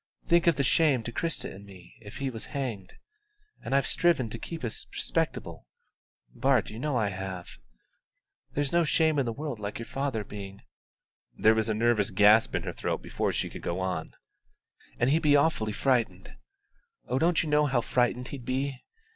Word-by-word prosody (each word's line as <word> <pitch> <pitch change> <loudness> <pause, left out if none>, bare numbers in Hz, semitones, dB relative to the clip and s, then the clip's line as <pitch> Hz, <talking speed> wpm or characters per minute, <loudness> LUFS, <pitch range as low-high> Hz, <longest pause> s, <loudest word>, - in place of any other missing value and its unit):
Think 170 0 +3
of 170 - +5
the 140 - 0
shame 140 -4 +3
to 115 - -5
Christa 165 +7 -2
and 100 - -11
me 95 -3 -14
if 105 -2 -10
he 135 -1 -2
was 115 -2 -6
hanged. 115 -9 -4 0.7
And 135 - -1
I've 140 -1 +3
striven 170 -10 +2
so - - -16
to 115 - -5
keep 165 +3 -7
us 115 - -3
respectable - - -2 0.7
Bart, 130 -5 +2
you 110 - -8
know 145 -1 0
I 105 -3 +1
have. 95 -2 -6 1.0
There's 145 -1 0
no 170 0 +4
shame 160 -1 +2
in 130 - 0
the - - 0
world 140 -1 -5
like 105 0 -4
your 115 - -6
father 135 -4 -2
being 100 -1 -9 0.4
" - - -42
(there 110 - +5
was 110 0 0
a 110 - +1
nervous 115 -2 +2
gasp 105 +3 +5
in - - -1
her - - -4
throat - - -3
before - - -1
she - - -1
could - - -9
go 85 +2 -3
on) 90 -4 -3 0.8
"and 120 +3 +2
he'd 160 +2 +3
be 145 -2 +5
awfully 140 -7 +2
frightened. 110 - 0 0.7
Oh, 125 - 0
you - - +1
don't 170 +1 +2
know 150 -1 +3
how 130 -3 +1
frightened 125 +1 0
he'd 135 -3 -7
be! 130 +1 -2
120 Hz, 195 wpm, -28 LUFS, 105-140 Hz, 1.0 s, of